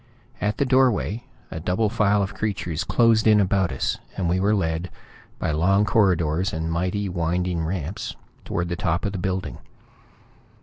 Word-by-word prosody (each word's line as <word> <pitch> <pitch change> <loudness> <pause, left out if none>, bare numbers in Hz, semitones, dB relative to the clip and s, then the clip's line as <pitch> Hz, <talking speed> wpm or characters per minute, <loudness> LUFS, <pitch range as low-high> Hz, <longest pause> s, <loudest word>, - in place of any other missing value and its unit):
At 105 0 0
the 140 - +2
doorway, 125 -3 +2 0.3
a 80 - -4
double 90 +6 0
file 105 -2 +2
of 95 - -4
creatures 90 -7 -2
closed 115 -2 +3
in 105 -1 +6
about 95 -3 +2
us, - - -2 0.2
and 90 - 0
we 90 +2 +1
were 105 +3 +2
led, 80 -2 -1 0.5
by - - -1
long 95 +7 +3
corridors 90 -4 +2
and 80 +1 -2
mighty 90 +4 -1
winding 90 -1 -1
ramps, 85 +1 -4 0.3
toward 85 0 -2
the 85 - -1
top 85 +2 -1
of 100 - -1
the 95 - -4
building. 95 +1 -3
95 Hz, 165 wpm, -24 LUFS, 85-105 Hz, 0.5 s, in